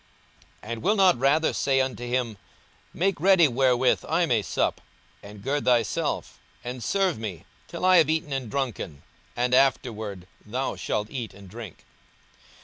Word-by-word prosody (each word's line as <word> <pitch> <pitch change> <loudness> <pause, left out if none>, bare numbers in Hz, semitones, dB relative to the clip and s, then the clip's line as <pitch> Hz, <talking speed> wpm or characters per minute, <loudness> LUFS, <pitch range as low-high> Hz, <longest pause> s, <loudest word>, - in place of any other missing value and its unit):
42:017:008 110 - -7
And 115 -1 -4
will 210 +3 +2
not 190 - +4
rather 145 +5 +3
say 135 -1 +1
unto 130 -2 -2
him, 120 -4 -2 0.5
Make 195 +1 0
ready 185 -3 +6
wherewith 130 0 +2
I 170 +2 +2
may 120 -8 +2
sup, - - -1 0.4
and 100 0 -12
gird 145 +3 -1
thyself, 120 -3 0 0.2
and 125 0 -6
serve 190 - +1
me, 100 -8 -6 0.2
till - - -4
I 185 0 +6
have 160 -3 +5
eaten 155 -2 -1
and 130 -4 -3
drunken; 110 - -4 0.3
and 125 +1 0
afterward 110 -8 +1 0.2
thou 125 +5 -3
shalt 105 +1 -3
eat 120 -5 -5
and 100 -1 -13
drink? 105 -2 -10
125 Hz, 155 wpm, -26 LUFS, 110-150 Hz, 0.5 s, ready